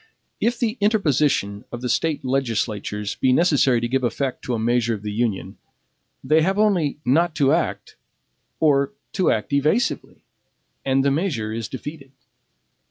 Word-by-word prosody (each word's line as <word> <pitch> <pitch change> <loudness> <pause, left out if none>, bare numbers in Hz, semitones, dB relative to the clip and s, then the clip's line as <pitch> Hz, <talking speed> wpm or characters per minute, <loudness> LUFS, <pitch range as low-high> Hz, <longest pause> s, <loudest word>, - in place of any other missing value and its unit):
If 235 +1 +1
the 230 0 -1
interposition 150 - +1
of 120 - -6
the - - -1
State 150 +3 0
legislatures 110 -5 -2
be 130 - +2
necessary 135 -4 +3
to 120 - 0
give 130 +2 0
effect 125 +2 -2
to 125 -4 -1
a - - -1
measure 120 0 +1
of 105 - -10
the 105 - -3
Union, 110 -2 -2 0.6
they 155 +1 +3
have 190 +5 +1
only 190 -10 +2
NOT 160 +6 +2
TO 140 -1 +3
ACT, 170 +3 -1 0.6
or 140 +2 +2 0.2
TO 185 - +2
ACT 110 +6 -1
EVASIVELY, 150 - 0 0.6
and 135 0 +1
the 140 - +3
measure 140 - -1
is 115 -1 -4
defeated. 135 +2 -8
135 Hz, 155 wpm, -22 LUFS, 120-160 Hz, 0.6 s, necessary